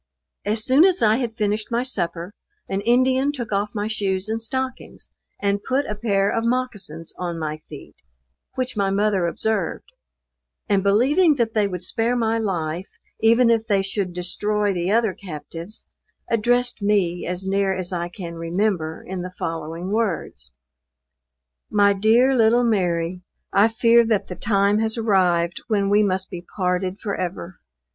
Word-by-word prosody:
As 215 +1 +1
soon 270 +5 +5
as 370 -5 +3
I 215 0 +4
had 240 -3 -3
finished 210 0 -1
my 235 +1 +1
supper, 175 -6 -3 0.3
an 195 +1 -2
Indian 255 +5 +3
took 240 -7 -6
off 205 +1 -1
my 205 0 -1
shoes 195 -3 -1
and 225 +1 -2
stockings 260 +3 -5 0.3
and 200 0 0
put 270 +2 0
a - - -3
pair 205 -2 +1
of 225 - -1
moccasins 225 -10 -2
on 175 -2 -3
my 155 -1 -4
feet, 150 - -11 0.6
which 255 -2 -2
my 200 -2 +1
mother 195 -2 +1
observed; 205 0 -2 0.8
and 200 -1 +2
believing 275 - +4
that 235 -4 0
they 210 -2 +2
would 180 -2 -5
spare 230 +5 0
my 225 -1 +1
life, 175 -4 -2 0.3
even 230 +2 +5
if 225 -1 +1
they 200 -2 +2
should 195 -1 -2
destroy 205 +4 -1
the 175 0 -2
other 220 -1 +2
captives, 170 +2 -8 0.5
addressed 245 +1 +1
me 195 -4 +1
as 180 +1 -2
near 195 0 +1
as 185 -1 -4
I 175 0 -2
can 175 -2 -7
remember 165 -1 -2
in 185 -1 -5
the 180 0 -7
following 165 +3 -4
words: 185 - -2 1.2
"My 205 -1 +4
dear 230 +7 +4
little 235 +1 +4
Mary, 180 -5 0 0.3
I 200 +2 +5
fear 230 +1 +4
that 215 -3 0
the 180 - -5
time 200 +2 +2
has 220 +1 0
arrived 180 -6 +1
when 200 -3 +1
we 205 +1 +5
must 190 -2 -1
be 175 - -6 0.2
parted 185 +1 -1
forever. 185 -3 -4
205 Hz, 160 wpm, -22 LUFS, 180-225 Hz, 1.2 s, soon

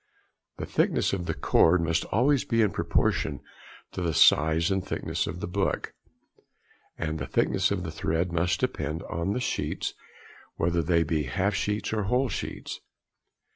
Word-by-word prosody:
The - - -4
thickness - - +1
of 90 -3 -2
the - - -1
cord 85 +3 +4
must 85 0 0
always 130 +5 +2
be 115 -1 +2
in 105 - +2
proportion - - 0 0.5
to - - -5
the 85 -3 -1
size 80 +3 +5
and 95 -1 0
thickness 100 - -2
of 90 - -5
the 105 - -3
book, 95 +2 -1 1.0
and 80 -1 -3
the - - -4
thickness - - +1
of 100 -3 -2
the 85 - -4
thread 85 +3 -1
must 85 +3 0
depend 80 - -2
on 85 +4 -2
the 125 - -1
sheets, 125 - -2 0.6
whether 85 0 +1
they 85 +1 +2
be 75 -1 -1
half 95 +11 0
sheets 105 +2 -1
or 105 -2 0
whole 125 +5 +1
sheets. - - -5
90 Hz, 165 wpm, -27 LUFS, 80-100 Hz, 1.0 s, size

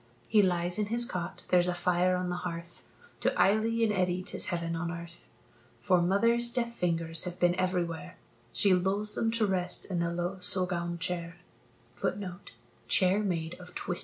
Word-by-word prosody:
He 215 -1 +5
lies 175 0 0
in 210 - 0
his 235 +2 +3
cot, 180 -7 -5
there's 180 -1 +4
a 180 - 0
fire 180 +1 +2
on 180 0 -2
the 180 - -2
hearth; 170 -1 -6 0.4
To - - +2
Eily 225 +3 +3
and 215 -2 +2
Eddy 185 -1 0
'tis 200 - -2
heaven 170 -2 -2
on 170 +1 -3
earth, 170 0 -10 0.5
For 175 +9 +3
mother's 230 +6 +2
deft 235 -1 -1
fingers 165 -4 0
have 180 0 -6
been 175 0 +4
everywhere; 180 -2 -2 0.3
She 195 +9 +4
lulls 195 +4 +1
them 225 - 0
to 225 -1 +1
rest 180 -2 -1
in 175 - 0
the 170 0 0
low 175 +2 -3
suggaun 175 -2 +2
chair. 170 0 -4
180 Hz, 155 wpm, -30 LUFS, 175-200 Hz, 0.5 s, He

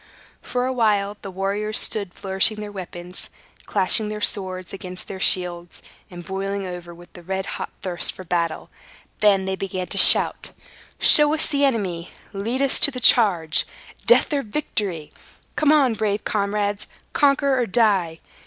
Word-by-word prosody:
For 250 0 -3
a 260 - -2
while, 210 -4 -1
the 195 - -9
warriors 200 +3 -2
stood 200 -4 0
flourishing 195 +3 +2
their 210 -1 -8
weapons, 180 -2 -8 0.4
clashing 210 +2 +1
their 210 0 -6
swords 185 -3 -2
against 185 -1 -8
their 190 - -8
shields, 175 -2 +1 0.3
and 175 -2 -11
boiling 195 +1 -5
over 175 -1 -9
with 175 +1 -17
the 175 - -13
red 190 +2 -5
hot - - -6
thirst 180 -2 -2
for 185 - -11
battle. 170 -2 -4 0.5
Then 200 -2 +2
they 190 0 -3
began 190 -1 -5
to - - 0
shout - - +6 0.4
"Show 295 -1 +7
us 315 - +1
the 285 -2 -1
enemy! 190 -10 -3 0.2
Lead 230 +7 -3
us 275 - +1
to - - +5
the 255 -2 -6
charge! 180 -11 +4 0.4
Death 475 - +3
or 285 - 0
victory!" 205 - -4 0.4
"Come 300 -1 +2
on, 280 -6 +3
brave 210 -1 -3
comrades! 205 -1 -3 0.3
Conquer 280 -2 +1
or 240 - -1
die!" 190 -6 0
200 Hz, 160 wpm, -21 LUFS, 185-220 Hz, 0.5 s, Show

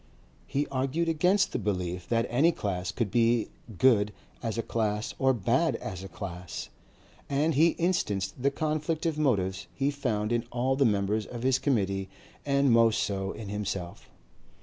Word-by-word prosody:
He 145 +2 0
argued 135 +5 0
against 180 +4 +3
the - - -2
belief 90 -3 -3
that 115 -1 +2
any 145 +8 +3
class 95 - -3
could 105 -1 -2
be 115 -1 +2 0.3
good 105 -4 +4 0.3
as 115 -2 -3
a 115 - 0
class 105 -2 -1
or 130 0 +4
bad 115 -8 +1
as 95 0 -6
a - - -6
class, 90 -3 -7 0.6
and 145 +3 +2
he 160 +4 +4
instanced 100 - 0
the 140 - +3
conflict 155 +2 -2
of 160 -2 0
motives 95 -10 0
he 140 +1 +1
found 115 -6 -1
in 120 0 0
all 125 +2 +1
the 135 0 +3
members 105 0 +1
of 120 -1 -7
his 130 0 +3
Committee 100 -7 0 0.4
and 140 -1 +3
most 115 -1 +4
so 95 -1 -2
in 105 -2 -7
himself. 100 -4 -4
115 Hz, 165 wpm, -28 LUFS, 100-140 Hz, 0.6 s, good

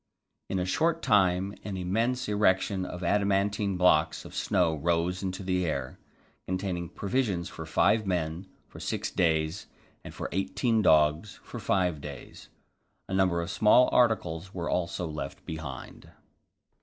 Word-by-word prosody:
In 95 - -1
a 90 - 0
short 165 - 0
time 95 -1 +3
an 100 -2 -5
immense 115 +8 -1
erection 100 -2 +1
of 90 0 -7
adamantine 100 +1 +1
blocks 90 -4 +3
of - - -11
snow 85 -3 +1
rose 85 +3 0
into 95 0 -4
the 90 -1 0
air, 70 -5 -3 0.5
containing 95 -2 -3
provisions 100 -5 -1
for 80 - -8
five 110 +6 +2
men 85 0 -2 0.2
for - - -12
six - - -3
days 80 +2 0 0.4
and - - -8
for - - -5
eighteen 95 +5 0
dogs 80 +3 +3
for - - -8
five 90 -6 0
days. 70 -3 -10 0.6
A - - -5
number 90 -3 +2
of 85 - -5
small 110 +4 +5
articles 95 -7 +1
were 85 -2 -3
also 85 0 -1
left 75 -4 -6
behind. 75 -5 -8
90 Hz, 145 wpm, -28 LUFS, 85-100 Hz, 0.6 s, small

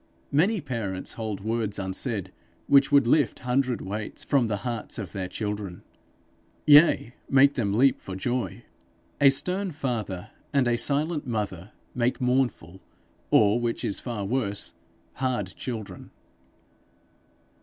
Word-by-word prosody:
Many 190 +8 +2
parents 115 -9 -4
hold 110 -3 -4
words 110 -1 -1
unsaid 95 0 -2 0.3
which 140 0 +5
would 140 -3 +6
lift 125 -2 +3
hundred 125 0 0
weights 105 +2 -5
from 135 -5 +2
the 105 -2 -1
hearts 115 -3 -3
of 100 -6 -5
their 95 -2 -4
children, 105 -2 -5 0.8
yea, 145 -5 +6 0.2
make 140 +1 +6
them 110 -7 -1
leap 130 +6 +3
for 95 - -6
joy. 120 +5 -2 0.6
A 140 - +8
stern 185 +8 0
father 120 - -4 0.2
and 135 -3 +3
a 120 - +3
silent 145 +5 -1
mother 105 -4 -3 0.2
make 125 0 0
mournful, 125 -9 0 0.5
or, 105 +2 +4
which 120 -1 -2
is 100 - -2
far 115 -5 -4
worse, 105 -3 -2 0.4
hard 125 -8 -1
children. 110 -7 -6
120 Hz, 130 wpm, -26 LUFS, 100-135 Hz, 0.8 s, A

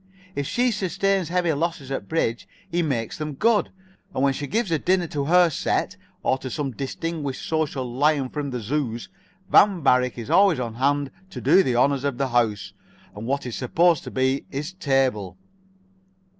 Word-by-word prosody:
If 140 -4 -3
she 245 0 +1
sustains 195 -3 0
heavy 175 -2 +1
losses 150 -3 -3
at 135 - -4
bridge, 115 -11 -1 0.2
he 175 +1 +1
makes 130 -8 -2
them 155 -2 -4
good, 220 - +2 0.5
and 130 - 0
when 140 -1 +3
she 145 +1 -5
gives 215 -1 -1
a 160 - +2
dinner 180 +1 +2
to 145 -3 -3
her 175 +2 +5
set, - - -1 0.3
or 130 - +1
to 130 - -6
some 140 0 -3
distinguished 140 +2 -4
social 155 -5 -1
lion 135 +2 +1
from 145 0 -4
other 125 -3 -4
zoos, 120 -1 -3 0.4
Van 195 -6 +5
Varick 125 -2 +3
is 115 -2 -6
always 195 -7 +5
on 120 -3 -3
hand 140 +3 0 0.2
to - - -7
do 195 - +5
the 130 -9 0
honors 135 +2 +2
of 140 -4 -1
his 135 -1 -1
house, 110 -5 0 0.4
and 105 +3 -6
what 140 +1 -1
is 125 - -4
supposed 165 +5 +2
to - - -5
be 130 +1 0
his 150 +6 -5
table. 135 - 0
140 Hz, 185 wpm, -24 LUFS, 130-165 Hz, 0.5 s, her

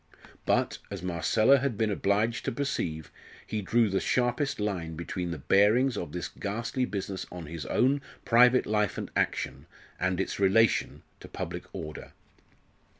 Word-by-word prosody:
But, - - +1
as 100 -3 -6
Marcella 110 +9 +3
had 130 -5 -1
been 110 -1 +1
obliged 105 +4 +1
to - - 0
perceive, 85 - -3 0.3
he 110 - -3
drew 115 +4 +3
the 95 -1 0
sharpest 125 +2 0
line 90 -6 -2
between 85 +2 -4
the 85 - -4
bearings 110 +6 +3
of 85 -7 -4
this 90 +1 -4
ghastly 115 +5 -3
business 95 -3 -4
on 90 -2 -7
his 80 -2 -6
own 140 +3 +2 0.2
private 125 +2 +5
life 105 -2 0
and - - -5
action, - - -1 0.3
and 90 0 0
its 95 - -2
relation 100 +2 +3 0.2
to - - -11
public - - -6
order. 75 -1 -8
105 Hz, 150 wpm, -28 LUFS, 90-120 Hz, 0.3 s, private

